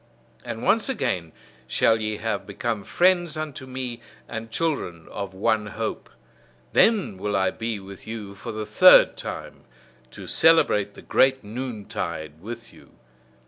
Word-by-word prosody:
And 115 - -6
once 225 +4 +3
again 105 - -1 0.4
shall 110 - +3
ye 110 0 -2
have 105 -3 -3
become 105 +1 -3
friends 175 - +2
unto 150 -4 -5
me, 125 -2 -5 0.3
and 115 0 -6
children 115 - -2
of 100 -2 -6
one 105 +2 +1
hope: 105 - -4 0.6
then 200 - +3
will 105 +1 -1
I 95 -1 +2
be 115 -2 -4
with 95 0 -12
you 110 -3 -6
for 110 +4 -7
the 110 0 -4
third 105 - +7
time, - - -7 0.4
to - - -10
celebrate 105 -11 +3
the - - -12
great 130 -1 +3
noontide 100 - -5
with 115 +3 -8
you. - - -18
110 Hz, 145 wpm, -25 LUFS, 100-130 Hz, 0.6 s, third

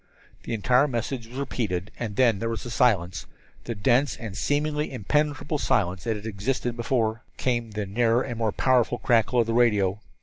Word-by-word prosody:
The 115 - -2
entire 125 +6 +3
message 120 -1 -3
was 125 +3 -10
repeated, 105 -9 -2
and 110 -4 -4
then 115 -4 +3
there 115 - -2
was 115 - -4
silence 95 -9 +1 0.4
the 115 - -3
dense 125 +7 +2
and 110 -4 -7
seemingly 150 +3 0
impenetrable 145 +5 -1
silence 90 -8 0
that 115 -1 0
had 105 0 -8
existed 120 +3 -2
before. 115 -2 0 0.2
Came 120 -3 -1
the 105 -1 -4
nearer 115 +4 +2
and 120 -3 -5
more 110 -2 +1
powerful 125 0 +2
crackle 120 +1 +3
of - - 0
the 115 - -2
radio. 105 -5 +3
115 Hz, 175 wpm, -25 LUFS, 105-130 Hz, 0.4 s, entire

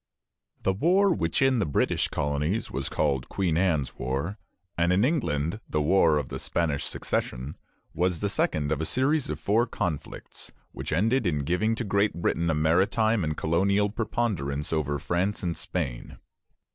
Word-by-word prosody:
The 95 - +2
war 185 - +3
which 85 +5 0
in 135 -2 +3
the 105 - +1
British 70 - +1
colonies 75 +9 -1
was 70 0 -3
called 70 -4 0
Queen 90 -5 0
Anne's 80 -7 0
War, 70 - -2 0.4
and 85 +1 +2
in 95 +5 +3
England 85 - -1
the 75 - 0
War 80 0 +4
of 70 -3 -3
the - - -5
Spanish 80 -5 -1
Succession, 65 +4 -3 0.4
was 90 -1 0
the 105 - 0
second 75 -6 0
of 80 0 0
a - - -1
series 140 +3 +1
of 75 -1 -3
four 110 +9 +2
conflicts 80 -9 -5 0.2
which - - -6
ended 110 +7 +2
in 75 -4 0
giving 90 +9 +1
to 120 - -3
Great 100 -3 +1
Britain 85 0 0
a 80 - +2
maritime 95 +7 +2
and 75 -1 -2
colonial 100 +5 +2
preponderance 100 - -2
over 75 -2 0
France 90 +8 -1
and 85 -2 -1
Spain. - - -4
85 Hz, 165 wpm, -27 LUFS, 75-105 Hz, 0.4 s, War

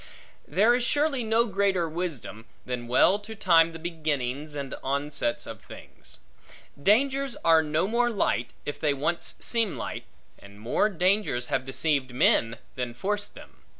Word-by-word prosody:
There 205 +10 +4
is 245 0 +1
surely 285 0 +1
no 225 +1 +2
greater 195 -4 +1
wisdom, 155 -9 -5 0.2
than 125 -1 -4
well 180 +11 +4
to 215 +2 -9
time 170 -5 +4
the 165 - -8
beginnings, 150 -4 -3
and 140 -2 -5
onsets, 140 -2 -2
of - - -9
things. - - -12 0.6
Dangers 270 - +2
are 165 -1 +6
no 155 +4 0
more 240 +2 +2
light, 155 - 0 0.2
if 145 - -5
they 145 -2 +1
once 165 +5 -1
seem 225 -5 -1
light; - - -5 0.3
and 100 0 -15
more 120 - +1
dangers 185 -9 +1
have 130 - 0
deceived 135 -2 0
men, 115 -2 +3 0.2
than 125 -2 -4
forced 205 +9 -3
them. - - -14
165 Hz, 150 wpm, -27 LUFS, 135-210 Hz, 0.6 s, are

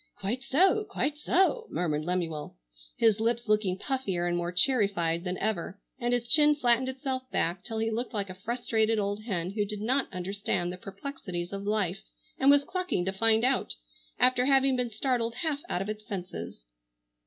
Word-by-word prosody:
"Quite 210 +6 -2
so, 370 +10 +3
quite 290 - -1
so!" 380 +9 +2
murmured 155 -3 -1
Lemuel, 165 - -3 0.4
his 220 -2 +4
lips 235 +1 0
looking 210 -3 +2
puffier 195 -8 -2
and 175 - 0
more 175 0 -2
cherry 210 +4 +4
fied 170 -3 -1
than 180 0 -3
ever 205 -2 -2 0.2
and 240 -1 0
his 245 -1 0
chin 300 +2 +6
flattened 255 -2 +2
itself 260 -1 -4
back 175 +2 0
till 225 +2 -5
he 225 0 0
looked 235 +3 -2
like 205 -4 -2
a 185 - -7
frustrated 225 +2 0
old 205 +1 -2
hen 180 -5 -2
who 210 +1 0
did 205 0 -5
not 255 +5 0
understand 185 -1 -2
the - - -7
perplexities 190 -3 -6
of 200 0 -5
life 210 -4 0 0.4
and 270 - +5
was 285 0 +6
clucking 365 - -2
to 190 - -1
find 225 +2 +4
out, 245 - +1 0.4
after 255 0 +4
having 270 -1 +4
been 250 -1 -1
startled 230 0 -1
half 300 +1 -1
out 180 - -1
of 200 - -7
its 215 0 -6
senses. 175 - -6
220 Hz, 185 wpm, -29 LUFS, 185-255 Hz, 0.4 s, chin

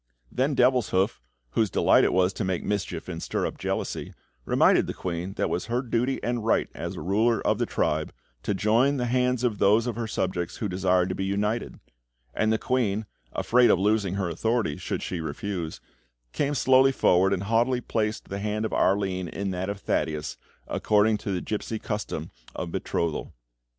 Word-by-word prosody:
Then 135 +3 0
Devilshoof, 120 -6 +2 0.3
whose 110 - +1
delight - - +4
it - - +3
was 90 +1 +2
to 110 - -3
make 95 -2 -1
mischief 100 -2 -3
and 85 -2 -5
stir - - -1
up - - -5
jealousy, - - -3 0.3
reminded - - +4
the - - -4
queen 90 +1 -4
that - - -2
it - - +1
was 90 - -2
her 120 +2 0
duty 125 +2 0
and 120 -2 -1
right 115 - +2
as - - -5
a - - -6
ruler 110 +4 +2
of - - +2
the - - 0
tribe - - 0 0.3
to 100 - -1
join 115 +8 +3
the 125 - 0
hands 125 0 +1
of 115 -5 0
those 105 +4 +4
of 120 -3 -2
her 115 -1 -2
subjects 90 -5 -2
who 105 - -2
desired 90 -1 +1
to - - -1
be 95 - -3
united; 105 +4 -1 0.5
and 110 0 +1
the 110 - +3
queen, 110 -4 0 0.3
afraid 125 0 +4
of - - +5
losing 100 -1 +1
her 95 -2 -1
authority 110 0 0
should - - -4
she 90 -3 -3
refuse, 80 +2 -4 0.5
came 145 0 0
slowly 130 0 +5
forward, 95 -6 +3
and 95 -1 0
haughtily 115 +4 +2
placed 110 -2 -2
the 100 - -4
hand 105 +1 -1
of - - -3
Arline 95 -2 +1
in 100 +3 -3
that 95 +1 -3
of 100 0 -5
Thaddeus, 75 -1 -1 0.3
according 105 0 +2
to 100 - -4
the 90 -2 -1
gipsy 110 +1 -3
custom 105 -1 -4 0.2
of 85 - -4
betrothal. 80 -5 -2
105 Hz, 190 wpm, -26 LUFS, 95-115 Hz, 0.5 s, of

